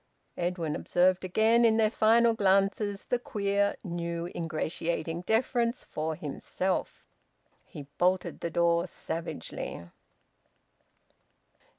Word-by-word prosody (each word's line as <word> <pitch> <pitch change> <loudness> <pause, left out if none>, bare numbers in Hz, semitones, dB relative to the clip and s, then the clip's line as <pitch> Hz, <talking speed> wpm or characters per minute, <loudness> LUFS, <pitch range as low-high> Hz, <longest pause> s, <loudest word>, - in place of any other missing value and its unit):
Edwin 175 -3 -2
observed 180 +1 +2
again, 220 +5 +3
in 225 -1 +5
their 215 -1 +3
final 230 +1 +4
glances, 200 0 +1
the 245 - 0
queer, 200 -6 0
new, 170 -1 -4
ingratiating 165 +1 -2
deference 235 +1 +1
for 155 +1 -3
himself. 180 +5 -3 0.6
He 145 - -9 0.2
bolted 180 +1 +1
the 170 - -3
door 170 +1 +2
savagely. 160 - -6
185 Hz, 95 wpm, -29 LUFS, 170-220 Hz, 0.6 s, in